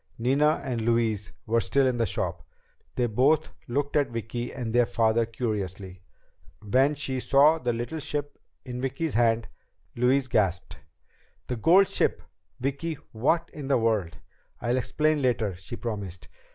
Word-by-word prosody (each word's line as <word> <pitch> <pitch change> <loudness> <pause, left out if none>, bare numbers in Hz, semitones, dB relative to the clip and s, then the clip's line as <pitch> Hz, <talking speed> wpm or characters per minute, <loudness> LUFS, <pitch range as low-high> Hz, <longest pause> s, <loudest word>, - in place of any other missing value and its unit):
Nina 140 +6 +2
and 125 -4 -2
Louise 110 -4 0
were 115 +1 +2
still 140 +3 +2
in 130 -2 +1
the 115 -1 +1
shop. 85 -2 -3 0.5
They 125 - +1
both 135 +7 +2 0.2
looked 140 +4 -1
at 145 -2 +3
Vicki 120 +1 -4
and 120 -4 -4
their 120 -1 +4
father 115 0 +2
curiously. 100 -5 -4 0.6
When 130 +8 +2
she 130 -2 -3
saw 145 +5 +5
the 125 -4 0
little 120 +7 -4
ship 145 -1 -4 0.3
in 125 -1 -5
Vicki's 135 +4 -2
hand, 115 -1 +2 0.5
Louise 130 +2 +2
gasped. 100 -7 0 0.7
"The 125 - -3
gold 180 - +5
ship, - - 0 0.4
Vicki! 140 +5 -2 0.2
What 165 +9 0
in 145 -3 -7
the 140 - +3
world 110 -7 0 0.2
...?" - - -40
"I'll 120 +2 0
explain 155 +4 +1
later," 115 -6 +1
she 90 +6 -8
promised. 100 -7 -5
120 Hz, 150 wpm, -27 LUFS, 110-140 Hz, 0.7 s, saw